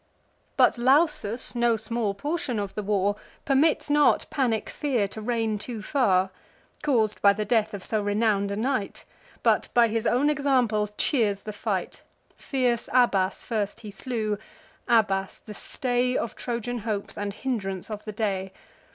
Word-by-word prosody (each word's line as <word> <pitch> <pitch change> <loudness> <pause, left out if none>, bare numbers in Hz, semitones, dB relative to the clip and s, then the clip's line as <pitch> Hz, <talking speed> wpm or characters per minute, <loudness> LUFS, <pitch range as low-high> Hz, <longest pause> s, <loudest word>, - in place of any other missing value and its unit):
But - - +4
Lausus, 260 -3 +2
no 240 -1 +2
small 220 -1 -2
portion 290 +1 -2
of 200 -2 -3
the 210 - -3
war, 205 0 +1 0.3
Permits 285 +3 +3
not 295 0 +4
panic 245 -7 0
fear 250 -9 0
to 220 - -8
reign 225 -2 -1
too 225 -1 -6
far, 190 -10 +2 0.5
Caus'd 230 -8 +1
by 200 -1 +6
the 210 +1 -3
death 220 -2 +2
of 195 - -8
so 215 -1 -1
renown'd 205 -1 +1
a 200 - -2
knight; 225 -2 -2 0.4
But - - +3
by 235 -1 +6
his 225 +1 -1
own 255 +4 +3
example 250 -8 +1
cheers 210 -8 +1
the 215 - -6
fight. - - -3 0.3
Fierce 250 -4 -1
Abas 200 -7 +2
first 210 -4 -2
he 210 -2 -8
slew; 215 -2 -3 0.5
Abas, 195 -4 +2
the 215 - -11
stay 250 +3 -1
Of 235 - -3
Trojan 240 0 -3
hopes, 210 -2 -4
and 205 0 -3
hindrance 200 -4 -4
of 210 0 -5
the 215 - -5
day. 195 -3 -2
220 Hz, 155 wpm, -26 LUFS, 205-250 Hz, 0.5 s, by